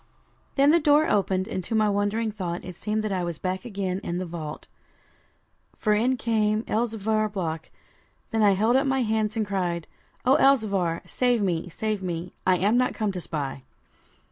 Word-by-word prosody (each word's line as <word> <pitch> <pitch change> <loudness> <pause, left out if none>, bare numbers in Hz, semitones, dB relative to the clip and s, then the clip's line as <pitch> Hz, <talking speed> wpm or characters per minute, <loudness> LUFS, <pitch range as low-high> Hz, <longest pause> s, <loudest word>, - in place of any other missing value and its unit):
Then 280 +1 +5
the 340 - +5
door 300 0 +4
opened, 190 -2 +1
and 185 - -3
to 225 - -3
my 215 -1 +3
wandering 205 +2 0
thought 180 -4 -4
it 180 - -6
seemed 215 +4 -2
that 215 - -2
I 185 -2 -1
was 170 -2 -3
back 185 +2 -3
again 195 -4 -2
in 175 - -3
the 185 - -2
vault, 160 -3 -6 1.1
for 215 - +2
in 245 +5 +2
came 215 -2 +1
Elzevir 220 -2 0
Block. 165 -5 -3 0.6
Then 225 - +1
I 205 -2 +6
held 220 +6 +2
up 270 +1 +3
my 265 -1 +2
hands, 220 0 0
and 220 - +1
cried 175 -4 -2 0.4
'O 260 +2 +5
Elzevir, 200 -11 +2
save 245 -4 +1
me, 180 -2 -1
save 210 +4 -2
me; 175 -1 -4
I 185 -1 +5
am 205 +6 +2
not 250 0 +1
come 215 -3 0
to 185 -2 -5
spy.' 140 -5 -4
205 Hz, 185 wpm, -26 LUFS, 180-225 Hz, 1.1 s, I